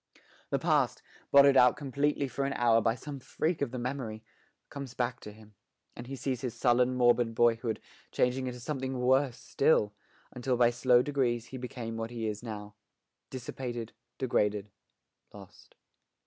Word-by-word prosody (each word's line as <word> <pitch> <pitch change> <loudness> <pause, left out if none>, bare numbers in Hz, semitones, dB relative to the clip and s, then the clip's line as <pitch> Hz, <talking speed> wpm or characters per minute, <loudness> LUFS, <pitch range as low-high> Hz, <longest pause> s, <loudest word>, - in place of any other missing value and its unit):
The - - +1
past, - - +1 0.3
blotted 140 0 +7
out 125 -1 +6
completely 140 +1 0
for 135 +1 -3
an 140 - -1
hour 115 -1 +3
by 115 +1 +1
some 140 +3 -7
freak 160 +5 -2
of 140 - 0
the 125 - -6
memory, 120 -3 -4 0.5
comes 140 -3 -7
back 120 -1 -1
to 105 - -9
him, 105 0 -17 0.4
and 120 - -9
he 135 - -5
sees 130 -2 -3
his 125 -3 -4
sullen, 125 0 +3
morbid 120 -2 +3
boyhood 115 -1 +2 0.3
changing 130 +1 +1
into 125 0 -5
something 130 0 -3
worse 130 0 +2
still, 105 -8 +2 0.4
until 125 0 -1
by 120 -1 +5
slow 125 0 +4
degrees 125 -5 -1
he 130 - -7
became 120 -2 -6
what 115 0 -3
he 115 -2 -4
is 105 -1 -4
now 105 -3 -7 0.6
dissipated, 120 -2 -6 0.2
degraded, 105 -5 0 0.6
lost. 100 -2 -15
125 Hz, 160 wpm, -30 LUFS, 115-130 Hz, 0.6 s, blotted